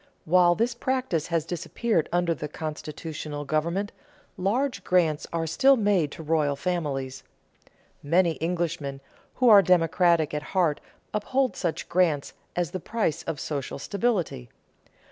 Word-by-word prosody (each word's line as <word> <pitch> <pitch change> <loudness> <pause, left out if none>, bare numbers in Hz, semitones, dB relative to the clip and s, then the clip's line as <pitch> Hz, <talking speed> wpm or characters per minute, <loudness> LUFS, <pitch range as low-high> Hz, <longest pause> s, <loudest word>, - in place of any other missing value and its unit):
While 175 +1 +5
this 235 +4 0
practice 250 - -1
has 165 -3 0
disappeared 175 +2 -1
under 175 -1 +2
constitutional 150 0 -6
government, 170 +8 -1 0.4
large 215 +3 -1
grants 165 -5 +2
are 165 -1 -1
still 270 - +4
made 200 -9 +2
to 160 - -8
royal 150 -2 +1
families. 140 -5 -3 0.8
Many 165 +2 +2
Englishmen 165 -5 -2 0.4
who 255 - +2
are 210 -3 +9
democratic 170 -3 +3
at 150 - -1 0.2
heart 165 -5 +2 0.3
uphold 255 +5 0
such 165 -3 -3
grants 165 -6 +1 0.2
as 175 -4 -1
the 185 - -3
price 215 -5 -1
of 160 -4 -3
social 140 -3 -4
stability. 175 - -1
170 Hz, 125 wpm, -26 LUFS, 150-195 Hz, 0.8 s, are